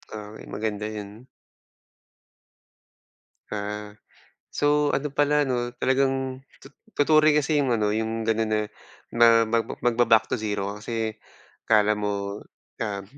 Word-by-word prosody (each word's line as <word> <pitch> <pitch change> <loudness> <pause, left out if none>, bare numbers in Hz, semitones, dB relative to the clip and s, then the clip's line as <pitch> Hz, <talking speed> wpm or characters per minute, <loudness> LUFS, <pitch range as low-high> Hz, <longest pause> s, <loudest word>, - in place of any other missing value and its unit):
Oo. 105 0 -8
Ay, - - -11
maganda 105 -1 -3
yun. 110 +3 -8 2.3
Ah. 105 0 -5 0.6
So, 145 0 +2
ano 145 +1 -1
pala 145 +1 +3
'no, 120 -2 -2
talagang 130 0 0 0.2
to 135 - -13 0.3
totoo 155 +1 +4
rin 150 - +4
kasi 150 +1 +2
yung 130 -4 +1
ano, 105 -2 +1
yung 110 +1 -2
ganun 110 0 +1
na 110 0 +1 0.5
ma 115 -1 +6
mag 115 0 0 0.2
magba-back 115 -2 +4
to - - 0
zero 105 -2 -2
ka - - -8
kasi 110 -1 -3 0.5
akala 105 -1 +4
mo, 100 0 -3 0.4
um 100 -2 -3
115 Hz, 130 wpm, -25 LUFS, 105-130 Hz, 2.3 s, ma